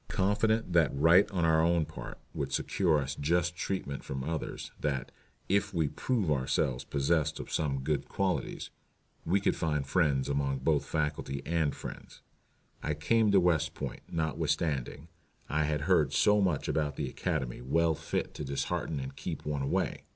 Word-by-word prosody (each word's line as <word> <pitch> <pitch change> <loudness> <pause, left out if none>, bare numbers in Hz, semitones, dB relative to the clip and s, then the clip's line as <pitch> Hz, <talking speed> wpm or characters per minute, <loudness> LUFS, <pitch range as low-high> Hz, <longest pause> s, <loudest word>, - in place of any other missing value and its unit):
Confident 105 +1 +1
that 85 -5 +4
right 85 +7 +6
on 90 -5 0
our 80 -1 +4
own 85 -1 +3
part - - -8 0.2
would - - -3
secure 85 -5 +2
us 70 -1 -2
just 85 +4 0
treatment 85 -7 -3
from 65 -1 -4
others, 80 +2 -4
that 70 -3 -2 0.4
"if 100 0 +1
we 80 -2 +2
but - - -17
prove 110 -11 0
ourselves 65 -2 0
possessed 75 +2 0
of - - -7
some 70 -4 0
good 75 +2 -1
qualities" 95 -2 -2 0.6
we 95 +4 +3
could 100 - +1
find 75 -4 -1
friends 70 -4 +2
among 70 -1 0
both 75 +2 +1
faculty 75 -3 -2
and 80 -3 +1
students. - - -9 0.6
I 75 - -1
came 110 +8 +3
to 100 - +6
West 85 -4 +2
Point, - - -5
notwithstanding 80 -4 -1 0.4
I 75 +1 +1
had 75 -1 -1
heard 80 -4 +3
so 105 -1 +4
much 90 -7 +1
about 75 -2 0
the - - -2
Academy 75 -11 -3
well 80 +6 +2
fit - - -3
to - - -5
dishearten 70 +2 -2
and 65 0 -6
keep - - -5
one 75 -2 -1
away. 70 - -1
80 Hz, 165 wpm, -30 LUFS, 70-85 Hz, 0.6 s, right